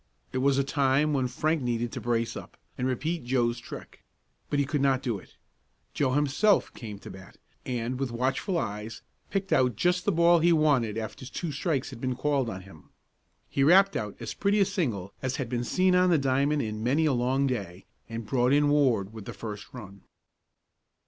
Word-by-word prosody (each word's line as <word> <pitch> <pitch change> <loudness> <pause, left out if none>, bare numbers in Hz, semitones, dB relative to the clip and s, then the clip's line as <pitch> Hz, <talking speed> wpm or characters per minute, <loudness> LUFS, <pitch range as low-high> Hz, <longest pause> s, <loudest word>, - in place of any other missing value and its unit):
It 130 - 0
was 135 +1 +3
a 140 - +3
time 140 +1 +2
when 130 -2 +1
Frank 155 +5 0
needed 120 -1 -1
to - - -6
brace 115 -1 -1
up, - - -9 0.2
and 125 - -1
repeat 155 +6 -2
Joe's 120 -1 0
trick. 120 - -10 0.5
But 145 - 0
he 140 - +2
could 145 0 -1
not 135 -2 +2
do 115 -6 -1
it. 90 - -19 0.6
Joe 130 -3 +1
himself 150 +9 +2
came 105 -4 -8
to - - -10
the - - -10
bat, 95 - -15 0.3
and 125 0 -2
with 135 -2 -1
watchful 130 - -1
eyes 105 -4 -4 0.3
picked 195 0 -1
out 125 -4 +3
just 180 - +1
the 205 - +3
ball 170 0 +5
he 170 +2 +4
wanted 140 -9 +2
after 115 +3 -6
two 165 +4 -4
strikes 145 -2 -1
had 120 -3 -10
been 130 -1 -1
called 140 -2 0
on 95 -4 -6
him. 90 -5 -16 0.6
He 135 - 0
rapped 190 +6 +6
out 105 -2 -3
as - - -5
pretty 205 +1 +1
a 200 - +5
single 125 - -2
as 130 -1 -2
had 130 -4 -3
been 120 0 -1
seen 185 +8 +2
on 180 0 +4
the 170 - +4
diamond 140 +2 +1
in 110 0 -4
many 140 +7 +2
a 150 - +3
long 130 +3 +1
day, 100 -9 -4 0.2
and 115 0 -5
brought 125 +2 +2
in 145 0 +4
Ward 120 -9 +2
with 110 -3 -9
the - - -6
first 105 -2 -7
run. 100 -5 -10
130 Hz, 205 wpm, -28 LUFS, 115-150 Hz, 0.6 s, rapped